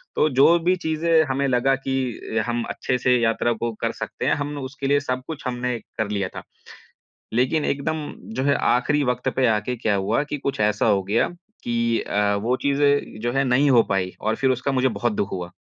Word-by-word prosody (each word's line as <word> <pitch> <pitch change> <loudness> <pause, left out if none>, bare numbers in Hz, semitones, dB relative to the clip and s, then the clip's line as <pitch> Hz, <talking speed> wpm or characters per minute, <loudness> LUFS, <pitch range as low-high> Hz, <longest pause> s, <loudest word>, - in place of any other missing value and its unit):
तो 155 - +3
जो 140 +6 +5
भी 185 +1 +4
चीज़े 160 -1 +2
हमें 135 +1 0
लगा 130 +1 +2
की 130 -4 -2
हम 120 0 -1
अच्छे 125 - -1
से 125 0 +3
यात्रा 115 +1 +1
को 120 0 0
कर - - 0
सकते - - -4
हैं, - - +3
हम 145 0 -4
उसके 135 +1 -5
लिए 145 +1 +3
सब 130 -2 -3
कुछ 155 -4 -6
हमने 125 -1 -2 0.2
कर 110 -2 -1
लिया 100 -2 -1
था। - - -6 0.9
लेकिन 130 +6 +1
एकदम 150 +2 -2 0.3
जो 130 - -1
है 140 0 +3 0.2
आख़िरी 145 +4 +1
वक़्त 125 -1 0
पे 130 -1 +2
आके 110 +3 0
क्या 110 -3 0
हुआ 105 +8 0
कि 145 0 -4
कुछ 140 -3 -3
ऐसा 105 +1 +2
हो 100 -3 +3
गया 105 +5 +1 0.3
कि 115 -1 0
अ, 100 0 0
वो 115 +5 0
चीज़े 140 0 +3 0.3
जो 120 0 -1
है 135 0 +2
नहीं 135 +3 +3
हो 120 -2 +6
पाई 95 -2 0
और 110 +1 0
फिर 135 0 +1
उसका 130 +2 0
मुझे 130 0 +2
बहुत 110 +1 -1
दुःख 100 - -1
हुआ। 90 -2 -5
125 Hz, 210 wpm, -23 LUFS, 115-140 Hz, 0.9 s, हो